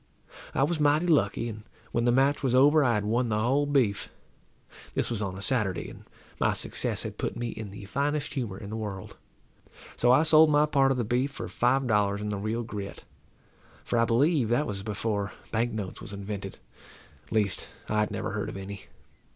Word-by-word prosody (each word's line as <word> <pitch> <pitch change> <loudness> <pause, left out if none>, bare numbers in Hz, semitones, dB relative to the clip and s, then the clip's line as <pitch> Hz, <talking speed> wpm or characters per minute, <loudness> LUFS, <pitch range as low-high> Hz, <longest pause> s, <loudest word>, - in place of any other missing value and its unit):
I - - +3
was 155 +3 0
mighty 150 +3 +3
lucky, 150 -7 +2
and 110 -2 -6 0.3
when 120 0 0
the 120 - +4
match 135 +3 +3
was 130 -3 +1
over 145 +4 +6
I 120 -4 +3
had 105 -1 -1
won 120 +3 +1
the 105 - +1
whole 135 +6 +2
beef. 125 -9 +1 0.9
This - - 0
was 110 -3 -1
on 95 -2 -3
a 100 - -6
Saturday, 105 -8 -1
and - - -14 0.3
my - - +2
success - - -1
had - - -7
put - - -2
me 120 0 -2
in 110 -2 -6
the 100 +1 -9
finest 145 +7 -1
humour 115 -9 -3
in 100 0 -8
the - - -3
world. 105 -4 -6 0.8
So 120 - +4
I 130 +5 +6
sold 160 0 +7
my 150 0 +4
part 135 -3 +3
of 135 - 0
the 120 - 0
beef 125 +5 0
for 140 - -6
five 130 +3 +1
dollars 105 -3 +2
in 105 0 -3
the 100 -1 -2
real 110 +3 -2
grit, 105 -3 -7 0.8
for 120 - 0
I 115 - +4
believe 130 +1 +2
that 120 +6 +2
was 100 -5 -4
before 100 -1 -2 0.2
bank 115 +2 0
notes 105 -4 -5
was 100 - -8
invented; 100 -1 -6 0.7
at - - -23
least, 105 -3 0 0.2
I 105 - 0
had 105 - +1
never 110 0 -3
heard 105 0 -3
of - - -7
any. 95 0 -8
115 Hz, 210 wpm, -28 LUFS, 105-135 Hz, 0.9 s, sold